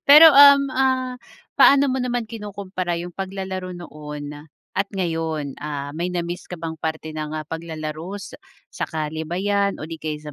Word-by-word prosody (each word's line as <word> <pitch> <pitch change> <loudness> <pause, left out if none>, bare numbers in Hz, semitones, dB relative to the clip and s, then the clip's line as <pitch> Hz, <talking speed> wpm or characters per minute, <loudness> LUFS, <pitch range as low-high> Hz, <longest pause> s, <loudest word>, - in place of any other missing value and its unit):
Pero 300 +3 +11
um, 280 0 +9
ah, 260 -1 +1 0.4
paano 280 0 +7
mo 260 - 0
naman 245 -1 -1
kinukumpara 200 -5 -4
'yong 175 +1 -5
paglalaro 190 -1 -5
noon 150 -3 -8 0.4
at 195 +1 +1
ngayon? 160 -5 -2
Ah, 145 -1 -4
may 170 +4 -2
na-miss 175 0 -4
ka 180 - -6
bang 160 -1 -5
parte 160 0 -3
ng 155 0 -4
ah, 155 - -4
paglalaro 160 +3 -5
sa 200 - -9 0.4
sa - - -2
kalye 155 0 -4
ba 175 - -3
'yan 200 +1 +1
o - - -7
di 160 0 -8
kaya 155 -1 -4
175 Hz, 170 wpm, -22 LUFS, 155-200 Hz, 0.4 s, Pero